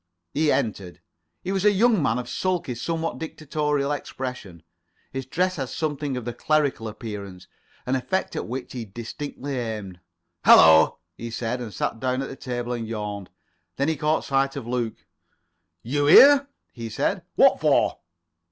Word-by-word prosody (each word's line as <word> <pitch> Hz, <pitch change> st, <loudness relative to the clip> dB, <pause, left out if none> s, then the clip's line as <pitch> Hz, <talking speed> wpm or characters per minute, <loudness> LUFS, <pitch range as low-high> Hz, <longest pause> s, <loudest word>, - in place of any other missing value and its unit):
He 155 Hz, 0 st, +2 dB
entered. 100 Hz, -5 st, -2 dB, 0.4 s
He 185 Hz, -, -3 dB
was 195 Hz, -1 st, 0 dB
a 210 Hz, -, +6 dB
young 215 Hz, -1 st, +3 dB
man 115 Hz, -5 st, +1 dB
of 125 Hz, -1 st, -4 dB
sulky, 175 Hz, +2 st, -1 dB
somewhat 165 Hz, +7 st, -3 dB
dictatorial 150 Hz, -2 st, -2 dB
expression. 125 Hz, -, -6 dB, 0.5 s
His 135 Hz, -1 st, -4 dB
dress 185 Hz, +5 st, 0 dB
had 135 Hz, -3 st, -3 dB
something 145 Hz, -4 st, -2 dB
of 125 Hz, -, -6 dB
the 120 Hz, -, -3 dB
clerical 145 Hz, -7 st, 0 dB
appearance, 105 Hz, -4 st, -7 dB, 0.4 s
an 130 Hz, +1 st, 0 dB
effect 190 Hz, +9 st, -2 dB
at -, -, -3 dB
which 125 Hz, +3 st, -6 dB
he 125 Hz, -2 st, -4 dB
distinctly 125 Hz, +5 st, -6 dB
aimed. 105 Hz, -6 st, -5 dB, 0.4 s
"Hallo," 80 Hz, 0 st, +7 dB, 0.2 s
he 115 Hz, -, -7 dB
said, 115 Hz, +2 st, -3 dB
and 115 Hz, -3 st, -6 dB
sat 115 Hz, -, -3 dB
down 130 Hz, +1 st, -1 dB
on -, -, -6 dB
the -, -, -7 dB
table 125 Hz, -2 st, -4 dB
and 115 Hz, -2 st, -4 dB
yawned. 105 Hz, -3 st, -5 dB, 0.5 s
Then 140 Hz, +3 st, 0 dB
he 160 Hz, -, 0 dB
caught 155 Hz, +1 st, 0 dB
sight 135 Hz, 0 st, +1 dB
of 140 Hz, -5 st, -5 dB
Luke. 120 Hz, -2 st, -3 dB, 0.8 s
"You 145 Hz, +4 st, 0 dB
here?" 280 Hz, -, +8 dB, 0.3 s
he 115 Hz, -2 st, -6 dB
said. 110 Hz, -, -1 dB
"What -, -, +5 dB
for?" -, -, +2 dB
130 Hz, 160 wpm, -24 LUFS, 115-150 Hz, 0.8 s, here